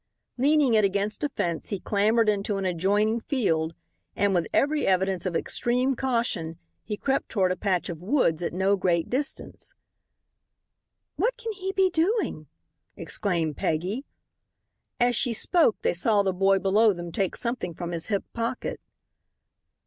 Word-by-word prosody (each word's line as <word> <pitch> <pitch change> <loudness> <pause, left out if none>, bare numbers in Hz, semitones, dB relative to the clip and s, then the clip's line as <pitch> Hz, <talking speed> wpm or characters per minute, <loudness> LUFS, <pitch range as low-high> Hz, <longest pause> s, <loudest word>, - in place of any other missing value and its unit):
Leaning 280 0 +3
it 215 -1 +4
against 200 +5 -1
a 295 - +1
fence 170 - -3
he 200 - -3
clambered 215 +4 +2
into 205 -1 0
an 195 - -2
adjoining 205 +6 +1
field, 165 - -1 0.4
and 200 -1 +2
with 170 -4 +1
every 295 +2 +1
evidence 190 -1 +1
of 175 - -3
extreme 250 +8 0
caution 230 -11 -1 0.3
he 210 - -4
crept 270 +4 -1
toward 190 -5 +1
a - - 0
patch 185 -2 -1
of 165 -2 -6
woods 180 - +1
at 170 - -2
no 190 +3 +2
great 175 -3 0
distance. 285 +5 -3 1.4
"What - - 0
can 460 -2 -4
he 385 -1 -4
be 380 -1 +3
doing?" 345 - 0 0.5
exclaimed 170 -7 -1
Peggy. 185 - -1 1.0
As 245 0 +3
she 240 +1 +1
spoke 310 - +2
they - - +2
saw 205 +3 +2
the 190 -1 0
boy 195 +1 +3
below 205 +3 +3
them 175 -1 -7
take 190 +1 -1
something 235 -8 -3
from 175 +1 -5
his 165 -1 -3
hip 200 -3 0
pocket. 235 +2 -3
205 Hz, 155 wpm, -26 LUFS, 180-245 Hz, 1.4 s, it